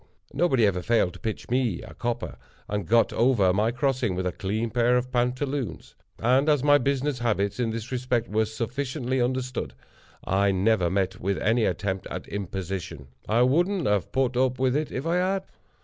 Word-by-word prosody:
Nobody 135 -6 +3
ever 90 -3 +1
failed 115 -4 +2
to 90 - -12
pitch 110 +2 -4
me 125 -2 0
a - - -11
copper, 120 -1 -3 0.3
and 105 -4 -3
got 115 0 +3
over 115 -6 +3
my 105 +4 +2
crossing 125 -4 0
with 90 0 -2
a 90 - 0
clean 110 +6 -2
pair 120 +1 +3
of 125 +1 -2
pantaloons. 125 - -2 0.2
And, 130 +5 +3
as 145 -3 +3
my 145 0 +6
business 140 -1 0
habits, 105 -3 0
in 120 -2 +1
this 115 +2 -5
respect, 125 -2 -1
were 110 +1 +1
sufficiently 125 +3 -2
understood, 125 - -2 0.5
I 100 +1 +2
never 95 -2 +2
met 95 0 -1
with 100 +1 0
any 115 +2 +2
attempt 95 +1 -2
at - - -6
imposition. 95 -7 -5 0.2
I 115 +3 +4
wouldn't 175 +8 +2
have 105 -3 0
put 130 -1 0
up 130 0 +2
with 130 0 +1
it, 150 0 -1
if 130 - -4
I 170 +2 +1
had. 190 +1 0
120 Hz, 180 wpm, -26 LUFS, 100-130 Hz, 0.5 s, my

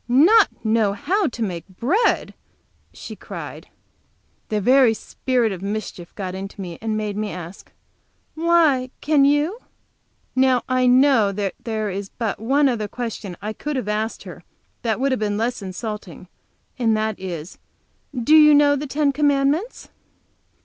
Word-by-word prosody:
"Not 330 - +4
know 220 -2 +2
how 380 - 0
to 235 -3 -4
make 180 -5 -4
bread?" 265 - 0 0.6
she - - -9
cried. - - -9 0.8
The 215 - 0
very 250 +1 +4
spirit 245 -1 -1
of 185 -2 -6
mischief 200 -4 -5
got 185 -3 -5
into 195 +2 -7
me, 175 -4 -7
and 220 -1 -2
made 210 -1 -3
me 210 0 -2
ask: 180 0 -9 0.6
"Why, 320 -6 +2
can 290 -2 +3
you?" 295 - +1 0.8
Now 260 -1 +3
I 255 -1 +2
know 250 -5 +4
there 210 +2 -3
is 195 +1 -5
but 225 -4 -4
one 275 +6 +2
other 225 -5 -1
question 215 -5 -6
I 215 +1 -3
could 295 +6 -5
have 255 -6 -3
asked 215 +2 -2
her, - - -11 0.4
less 230 -1 -1
insulting 200 -1 -6
than - - -14
this, - - -31 0.5
and 225 -3 +2
that 215 -1 -2
is: 175 -3 -7 0.6
"Do 250 +5 +3
you 300 -1 +8
know 290 0 +5
the 290 +1 -4
Ten 285 +1 +1
Commandments?" 290 - 0
230 Hz, 145 wpm, -22 LUFS, 205-280 Hz, 0.8 s, you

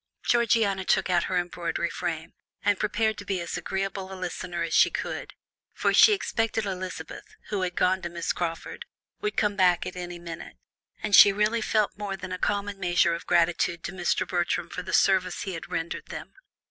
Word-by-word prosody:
Georgiana 225 -5 +2
took 190 0 +2
out 175 -1 +3
her 185 - -1
embroidery 170 -1 -2
frame, 160 +1 -4 0.3
and 205 -2 +3
prepared 215 +1 0
to - - -7
be 190 -1 -2
as 170 - -4
agreeable 195 0 -3
a - - -6
listener 175 -1 -4
as 165 - -3
she - - +6
could, - - -5 0.4
for - - +1
she - - +8
expected 225 - -1
Elizabeth, 185 -1 -6
who 205 -2 -1
had 180 -1 -2
gone 185 +1 +2
to 175 - -4
Miss 170 0 -2
Crawford, 165 -2 -4 0.3
would 420 0 -3
come 210 -1 +2
back 180 -3 +3
at 180 - -6
any 175 -1 -6
minute, 170 -1 -9 0.5
and 210 -2 +3
she 200 - +10
really 210 +3 +1
felt 215 -1 +1
more 200 -2 -3
than 185 0 -7
a 185 - -4
common 205 -1 -1
measure 175 -2 +3
of 170 - -6
gratitude 170 0 +2
to - - -4
Mr. 180 -2 0
Bertram 175 -1 -1
for 180 - -4
the 185 +1 -7
service 185 -2 +2
he 190 - -4
had 165 - -7
rendered 165 +1 -4
them. - - -8
185 Hz, 195 wpm, -27 LUFS, 175-205 Hz, 0.5 s, she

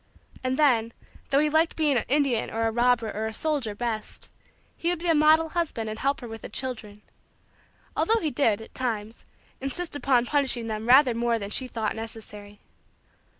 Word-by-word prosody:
And 255 0 -1
then, 230 -6 +3 0.4
though 275 - +2
he 300 +2 +4
liked 315 +2 +2
being 300 -3 +2
an 240 - +1
Indian 275 -4 +1
or 225 0 -1
a 225 - +1
robber 240 -1 +2
or 220 +1 -2
a 220 - -5
soldier 285 -9 -1
best, 225 -1 -2 0.4
he 335 - -2
would 355 - 0
be 340 - -8
a - - +5
model 315 +1 +4
husband 295 -11 -2
and 215 - -7
help 275 +1 0
her 240 - -7
with 225 0 -8
the - - -8
children; 220 -4 -5 0.9
although 450 +1 +2
he 310 -6 -2
did, 225 -7 +1
at - - -15
times, 225 -3 -3 0.3
insist 290 +5 -4
upon 255 -4 +2
punishing 265 -4 0
them 220 0 -4
rather 255 0 +6
more 235 0 0
than 200 -2 -6
she 255 - 0
thought 220 -3 -3
necessary. 210 -2 -9
245 Hz, 190 wpm, -26 LUFS, 225-290 Hz, 0.9 s, rather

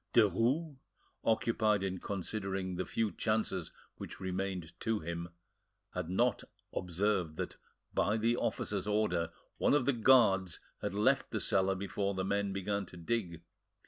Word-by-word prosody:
Derues, 120 - +3 0.5
occupied 110 -2 +2
in 95 -1 -2
considering 95 -1 -3
the 95 - -2
few 110 -2 0
chances 110 -6 -1 0.3
which - - -8
remained 95 -2 -3
to 115 -1 0
him, 85 +1 -4 0.6
had 90 -2 -3
not 115 +4 +2 0.3
observed 90 -2 0
that, - - -4 0.4
by 105 +2 +2
the 115 +2 +2
officer's 115 - -1
order, 95 -6 +1 0.3
one - - +4
of 140 -4 +2
the 140 - +3
guards 105 - +4 0.2
had - - -2
left 105 +1 +3
the - - -2
cellar 95 0 +2
before 100 +1 -2
the 95 0 -1
men 100 0 0
began 100 +1 -1
to 90 - -11
dig. 85 -2 -2
100 Hz, 145 wpm, -33 LUFS, 90-110 Hz, 0.6 s, one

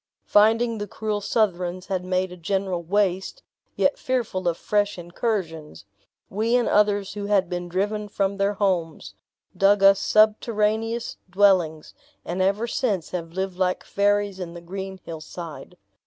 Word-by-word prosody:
Finding 225 +2 +3
the 205 - -4
cruel 210 0 -3
Southrons 185 -4 0
had 185 -2 -2
made 185 0 -1
a - - -8
general 185 0 -2
waste, 190 - -1 0.3
yet 280 - +1
fearful 225 -8 -1
of 170 -1 +1
fresh 205 -1 0
incursions, 175 - -4 0.4
we 220 +4 0
and 245 -1 +2
others 205 -1 +2
who 205 0 -5
had 200 -3 +2
been 175 0 -4
driven 210 +4 -1
from 200 -1 -1
their 200 +1 +1
homes, 180 -6 -1 0.4
dug 200 0 +4
us 195 0 +7
subterraneous 220 +1 +1
dwellings, 180 -5 +2 0.3
and 180 +2 -2
ever 200 +4 +1
since 220 - -1
have 165 -2 -5
lived 190 0 -3
like 185 -1 0
fairies 205 -1 +1
in 175 -2 -6
the - - -7
green 190 +2 -6
hillside. 165 0 -8
195 Hz, 145 wpm, -24 LUFS, 180-210 Hz, 0.4 s, us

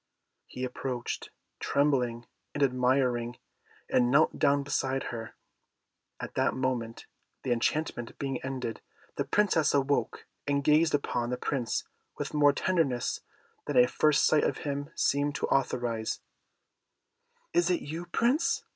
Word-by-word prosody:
He 125 - -6
approached, 125 -1 -4 0.3
trembling 125 -5 +1 0.3
and - - +1
admiring, 125 -2 +1 0.5
and 120 -1 +3
knelt 140 +5 +3
down 140 0 +3
beside 135 -1 -1
her. 115 -1 -6 0.8
At - - -6
that - - +1
moment, 125 -3 -2 0.4
the 125 - -1
enchantment 120 0 -1
being 135 -2 -3
ended, 130 -4 -4 0.4
the - - 0
Princess 180 -8 +2
awoke, 140 0 0 0.2
and 140 0 +1
gazing 155 +1 +4
upon 120 -4 -2
the 125 - -1
Prince 125 -2 -1 0.3
with - - -4
more 145 -1 +5
tenderness 140 -6 0 0.4
than - - -1
a 250 0 +7
first 150 -9 +3
sight 155 - +4
of - - 0
him 145 0 -3
seemed 145 +1 +1
to - - -1
authorize, 120 -4 0 1.3
"Is 175 +1 +3
it 180 - +1
you, 165 +4 -6
Prince?" 250 - +1
135 Hz, 130 wpm, -29 LUFS, 125-150 Hz, 1.3 s, a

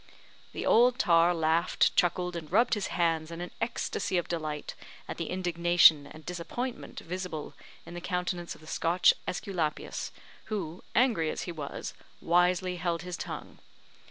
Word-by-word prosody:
The - - -4
old 245 +2 +5
tar 170 -7 +5
laughed, 165 +1 +2
chuckled, 180 0 +1
and 160 -2 -6
rubbed 230 +6 +4
his 210 -4 0
hands 165 -2 0
in 165 0 -7
an 175 0 -5
ecstacy 230 -4 -1
of 175 - -1
delight 155 -3 -4 0.3
at - - -5
the - - -3
indignation 175 -4 +4
and 155 +1 -13
disappointment 180 +9 -5
visible 180 -3 -5 0.3
in - - -10
the 175 - -6
countenance 180 -1 -2
of - - -17
the - - -14
Scotch 170 +3 +3
Esculapius, 175 -5 -3 0.3
who, 180 -5 -4
angry 230 -11 +3
as - - -3
he 175 - -5
was, 150 -4 -6 0.3
wisely 180 +1 +2
held 170 -1 -1
his 180 -1 -5
tongue. - - -7
175 Hz, 155 wpm, -29 LUFS, 165-180 Hz, 0.3 s, old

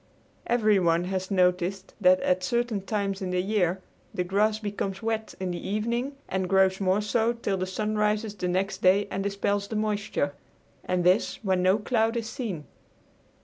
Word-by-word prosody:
Everyone 200 -8 +3
has 185 0 -3
noticed 185 0 +1
that 185 -1 +6
at 180 0 +1
certain 235 +1 0
times 195 -1 -2
in 185 - -2
the 180 0 0
year 185 -2 0 0.3
the 180 - 0
grass 210 +4 +1
becomes 205 -1 -4
wet 220 -1 -2
in 185 -1 -2
the 175 - -4
evening 235 +7 -2
and 185 -1 -2
grows 190 0 +3
more 190 +2 +2
so 225 +2 +1
till 230 -4 -2
the 185 0 -2
sun 210 +3 -2
rises 210 0 0
the 185 -3 -3
next 190 +2 -1
day 190 +2 +4
and 195 - -2
dispels 200 0 -1
the 220 - -5
moisture, 210 -9 -1 0.5
and 180 -1 0
this 180 +4 +3
when 190 -3 +1
no 185 +2 +4
cloud 225 +1 +1
is 230 -1 -3
seen. 205 - -5
195 Hz, 175 wpm, -27 LUFS, 185-215 Hz, 0.5 s, that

